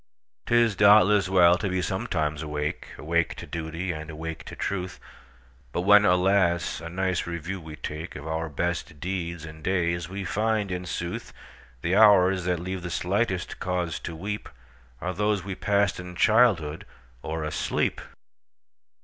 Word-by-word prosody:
'T 120 - +2
is, 115 -3 +4
doubtless, 105 -1 +6
well 90 -1 +5
to 100 - -1
be 95 0 0
sometimes 80 -5 -1
awake,—Awake 75 +2 -2
to - - -8
duty, 85 +3 -4
and 80 -1 -6
awake 80 +1 -6
to - - -9
truth,—But 65 -7 -7
when, 105 +2 +6
alas! 90 -2 +2
a 85 - -5
nice 95 0 -1
review 85 +3 -4
we 80 -1 -9
takeOf 75 +2 -7
our 80 +1 -2
best 85 0 -3
deeds 85 -3 -4
and 80 0 -11
days, 85 -3 0
we 100 +1 -5
find, 105 0 0
in 90 0 -3
sooth, 85 +1 -4 0.5
The 90 +3 +1
hours 95 -3 +6
that 90 -2 0
leave 95 +1 -4
the 85 - -5
slightest 95 +1 -1
cause 90 -2 -2
to 80 - -7
weepAre 65 -5 -7
those 105 -1 0
we 100 0 -4
passed 100 0 +1
in 90 0 -8
childhood 100 -8 +3 0.3
or 80 0 -4
asleep! 75 - -1
90 Hz, 145 wpm, -26 LUFS, 80-95 Hz, 0.5 s, doubtless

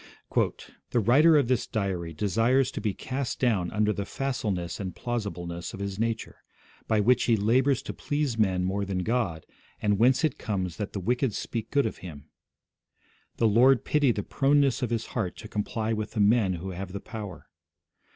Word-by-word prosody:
'The 120 - -1
writer 145 +9 +5
of 140 -5 +2
this 125 -2 +1
diary 95 -6 -2
desires 115 - +2
to - - -5
be 105 - 0
cast 130 +6 -4
down 105 -9 +1
under 105 0 +1
the 100 - -3
facileness 100 -8 -3
and 95 -3 -5
plausibleness 90 -8 -4
of - - -10
his 100 0 -4
nature, 115 0 -2 0.5
by 110 - +2
which 120 +4 +3
he 115 -2 +3
labours 125 +6 +2
to - - -5
please 145 -4 -1
men 95 -5 +1
more 95 +2 -1
than 95 -2 -2
God, 100 -8 -1 0.3
and 105 -1 +1
whence 125 +6 +4
it 155 -5 0
comes 95 -5 -3
that 105 -2 -4
the 100 - -3
wicked 120 +3 0
speak 115 -2 -4
good 140 -2 +2
of 110 - -4
him... 75 -4 -10 1.1
The 115 - +3
Lord 120 +3 +5
pity 145 -4 +3
the 105 -3 -3
proneness 140 +1 +2
of 125 - -1
his 115 -1 -1
heart 105 -7 -2
to 110 - -9
comply 110 +1 -2
with 110 -1 -4
the 110 - -3
men 105 -2 +4
who 90 +2 -5
have 95 +1 -6
the 100 - -4
power 105 -5 -8
110 Hz, 185 wpm, -27 LUFS, 95-125 Hz, 1.1 s, writer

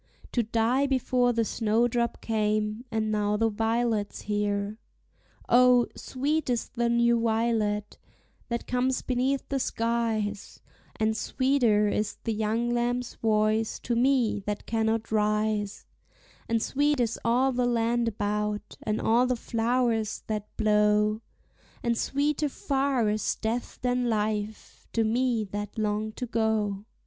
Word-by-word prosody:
To 240 - +2
die 235 +5 +1
before 255 -2 +2
the 230 -1 +1
snowdrop 235 +2 0
came, 215 +1 -1
and 220 -2 -1
now 210 0 +1
the 225 +1 +2
violet's 225 -1 -1
here. 205 0 -2 0.7
O, 250 0 +6
sweet 290 +3 -2
is 240 -2 -1
the 235 -1 -1
new 235 0 +3
violet, 220 -2 0 0.5
that 235 0 -2
comes 255 +1 0
beneath 260 +2 0
the 275 - 0
skies; 225 -4 -2 0.4
And 220 0 0
sweeter 240 -4 +2
is 210 0 -1
the 225 - -1
young 220 +3 0
lamb's 240 +1 -1
voice 215 0 +1
to 240 - -1
me 245 -3 +2
that 210 0 -3
cannot 225 0 -1
rise; 210 -1 0 0.6
And 230 -1 +1
sweet 290 0 +1
is 235 -2 0
all 250 +3 +3
the 250 -1 0
land 235 0 +1
about, 210 -1 -2
and 215 0 -1
all 240 +3 +3
the 250 - +1
flowers 230 -1 0
that 210 -1 -3
blow; 210 0 +3 0.6
And 235 -1 +1
sweeter 290 +4 0
far 270 -4 0
is 210 +1 0
death 230 +2 -3
than 250 -1 +1
life, 215 -1 -3
to 225 - +2
me 235 0 +1
that 205 +1 -5
long 215 0 -1
to 250 - -4
go. 220 -3 0
225 Hz, 135 wpm, -27 LUFS, 215-245 Hz, 0.7 s, O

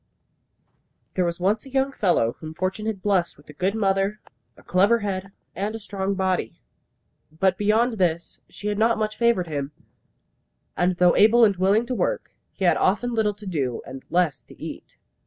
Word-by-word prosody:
There 185 - +1
was 170 0 -2
once 200 +4 +1
a 270 - -12
young 270 +1 +1
fellow 175 - +1
whom 160 0 -8
fortune 190 +5 -2
had 200 -4 -3
blessed 190 -4 +1
with 145 - -21
a - - -10
good 185 +7 -1
mother, 195 0 +1 0.4
a - - -17
clever 205 +6 +3
head, 195 -1 -3 0.2
and 205 +3 -2
a - - -5
strong 200 -1 -3
body. 185 - -1 0.7
But 185 +4 +1
beyond 220 +3 +1
this 170 -2 -1
she - - -11
had 210 0 -1
not 230 +1 +3
much 215 0 -2
favoured 235 -6 +2
him; 145 -3 -4 1.0
and 180 +1 +1
though 180 -1 +4
able 225 +3 +6
and 200 -2 +2
willing 195 +5 +2
to 255 - -3
work, - - -1 0.2
he 190 - -3
had 175 - +4
often 235 +6 +1
little 215 -2 +1
to 205 +1 -12
do, 140 -10 -2
and 135 0 -8
less 175 -4 +1
to - - -16
eat. - - -9
195 Hz, 185 wpm, -24 LUFS, 180-215 Hz, 1.0 s, able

